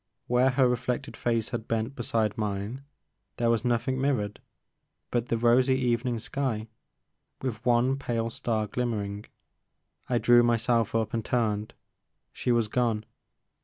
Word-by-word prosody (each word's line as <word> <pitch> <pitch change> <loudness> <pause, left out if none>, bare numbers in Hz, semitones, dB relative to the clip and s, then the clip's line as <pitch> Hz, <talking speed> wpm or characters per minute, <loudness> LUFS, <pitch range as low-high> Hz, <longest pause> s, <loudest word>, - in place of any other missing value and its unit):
Where 125 +2 +3
her 130 0 +3
reflected 125 0 -2
face 115 -2 0
had 115 -2 -4
bent 115 +4 -1
beside 110 -4 0
mine 105 +4 -3 0.6
there 115 -1 +2
was 115 0 +1
nothing 125 +2 0
mirrored 120 -7 -1 0.7
but 120 0 0
the 115 - 0
rosy 125 +3 +4
evening 120 -1 0
sky 115 -2 -2 0.8
with 120 -4 -3
one 125 +2 +3
pale 115 -4 -2
star 110 -2 -1
glimmer 115 -1 -1
ing. 100 +1 -6 0.8
I 125 - +2
drew 120 +1 +6
myself 115 -1 +2
up 110 -2 0
and 115 -1 -1
turned. 110 -3 -1 0.6
She 125 - -1
was 120 -2 +2
gone. 110 -2 0
120 Hz, 140 wpm, -28 LUFS, 110-125 Hz, 0.8 s, drew